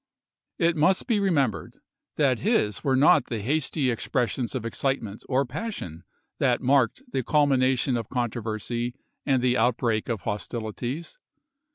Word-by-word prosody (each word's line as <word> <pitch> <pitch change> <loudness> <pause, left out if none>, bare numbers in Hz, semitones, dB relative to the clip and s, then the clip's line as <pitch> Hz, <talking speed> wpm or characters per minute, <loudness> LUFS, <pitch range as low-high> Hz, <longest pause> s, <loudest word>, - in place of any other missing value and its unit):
It 170 0 +2
must 185 +5 +2
be 230 -5 +1
remembered 155 - 0 0.4
that 135 -5 +2
his 200 - +1
were 135 -2 +2
not 140 0 +5
the 115 - -4
hasty 140 0 +1
expres 120 +1 -1
sions 125 0 -3
of 120 -3 -3
excitement 115 -3 -2
or 135 +1 +2
passion 125 - -6 0.3
that 125 -3 +2
marked 135 - +2
the 130 - 0
culmination 130 -2 +2
of 115 -3 -3
controversy 120 0 -3 0.3
and 130 -3 +2
the 125 0 +3
outbreak 115 -1 +1
of 115 -5 -2
Nov.19,1863. - - -25
hostilities. 120 - -5
130 Hz, 145 wpm, -26 LUFS, 115-145 Hz, 0.4 s, not